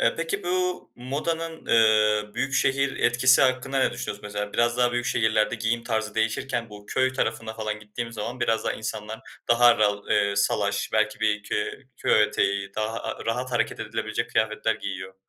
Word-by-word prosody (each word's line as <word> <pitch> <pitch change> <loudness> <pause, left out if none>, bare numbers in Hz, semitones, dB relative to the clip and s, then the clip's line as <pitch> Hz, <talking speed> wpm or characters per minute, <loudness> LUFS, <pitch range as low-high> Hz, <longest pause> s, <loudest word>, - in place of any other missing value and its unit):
Eee, - - +3
peki 165 0 -2
bu 180 0 -1
modanın, 160 +6 -4
eee, 105 -2 +3
büyükşehir 135 0 +1
etkisi 125 +2 +4
hakkında 130 +1 +1
ne 130 - +3
düşünüyorsun? 105 -3 -5
Mesela 105 0 -4
biraz 120 0 +2
daha 125 -1 +2
büyük 120 0 -1
şehirlerde 110 -2 +2
giyim 115 +1 -1
tarzı 110 -3 -2
değişirken 115 +1 -1
bu 105 0 -12
köy 130 0 +1
tarafına 110 -2 -2
falan 110 -1 -4
gittiğimiz 115 +2 -6
zaman 115 +3 -5
biraz 115 -2 +1
daha - - 0
insanlar 110 0 -5 0.3
daha 120 0 +6
ral 105 -1 +1
eee, 100 -1 +2
salaş 100 0 0
belki 110 0 +1
bir 105 -1 +1
köy 105 - -2 0.3
köy 110 - +3
eteği 100 -1 0
daha, 110 +1 -2
aaa, - - -5
rahat 125 +3 -1
hareket 120 - 0
edilebilecek - - -3
kıyafetler 110 0 +1
giyiyor. 95 -1 -6
110 Hz, 170 wpm, -25 LUFS, 105-125 Hz, 0.3 s, daha